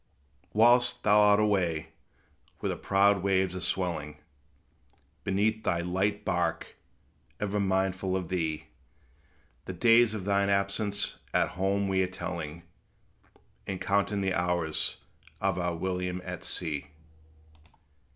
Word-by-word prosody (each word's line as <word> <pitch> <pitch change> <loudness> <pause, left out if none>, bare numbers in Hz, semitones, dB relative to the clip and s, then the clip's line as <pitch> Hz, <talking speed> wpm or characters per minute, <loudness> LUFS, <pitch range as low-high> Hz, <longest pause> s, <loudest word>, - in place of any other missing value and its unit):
Whilst 120 +2 +4
thou 105 0 +5
art 105 0 +5
away, 90 -7 +1 0.7
where - - -2
the - - -2
proud 100 0 +3
waves 95 -1 +1
are - - -3
swelling 80 -6 -2 1.1
Beneath 105 +3 0
thy 85 -1 0
light 95 +4 -1
bark, 85 -3 -1 0.6
ever 105 0 -1
mindful 95 -1 0
of 90 -3 -5
thee, 80 -4 -2 1.0
The - - -5
days 115 -1 +4
of 100 -4 -5
thine 100 0 +2
absence, 100 +1 -1 0.2
at - - +3
home 100 +2 0
we 95 -1 +1
are 95 - +1
telling, 85 -3 -6 1.0
And 95 -2 -3
counting 100 +1 0
the 95 -1 0
hours 85 -3 0 0.4
of 90 - 0
our 90 -1 -1
William 90 +1 -2
at 90 -1 -6
sea. 75 -4 -4
95 Hz, 120 wpm, -29 LUFS, 90-100 Hz, 1.1 s, thou